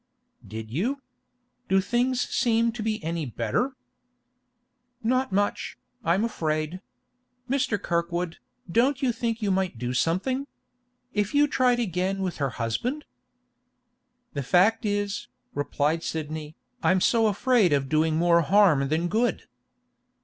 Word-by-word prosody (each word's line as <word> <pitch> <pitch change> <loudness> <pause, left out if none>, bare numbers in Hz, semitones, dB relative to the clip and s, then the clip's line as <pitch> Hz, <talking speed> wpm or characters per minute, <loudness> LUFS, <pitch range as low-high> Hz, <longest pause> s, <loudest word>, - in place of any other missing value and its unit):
'Did 110 0 -7
you? 235 - -1 0.7
Do 190 - +4
things 245 +5 +1
seem 230 -1 +2
to 230 0 -6
be 215 0 -2
any 165 0 -2
better?' 120 - -1 1.3
'Not 255 +3 +1
much, 205 +1 -1 0.3
I'm 190 +4 +2
afraid. 155 -4 -2 0.7
Mr. 255 -6 0
Kirkwood, 170 -1 -2 0.3
don't 265 - +2
you 255 - +3
think 230 -1 -2
you 200 - +1
might 185 -7 0
do 125 +2 -3
something? 195 - 0 0.7
If 210 +5 -1
you 290 +1 +5
tried 250 -3 +2
again 190 -2 -1
with 185 -2 -3
her 140 -2 0
husband?' 130 - -2 1.3
'The 140 - -2
fact 200 - +3
is,' 205 +3 -2 0.3
replied 145 +3 0
Sidney, 155 -1 -5 0.3
'I'm 185 - +3
so 225 +4 +3
afraid 215 -2 +3
of 140 -2 +2
doing 155 +2 +2
more 170 +1 +4
harm 165 -5 +4
than 160 +4 0
good. 225 +6 0
190 Hz, 130 wpm, -26 LUFS, 160-235 Hz, 1.3 s, you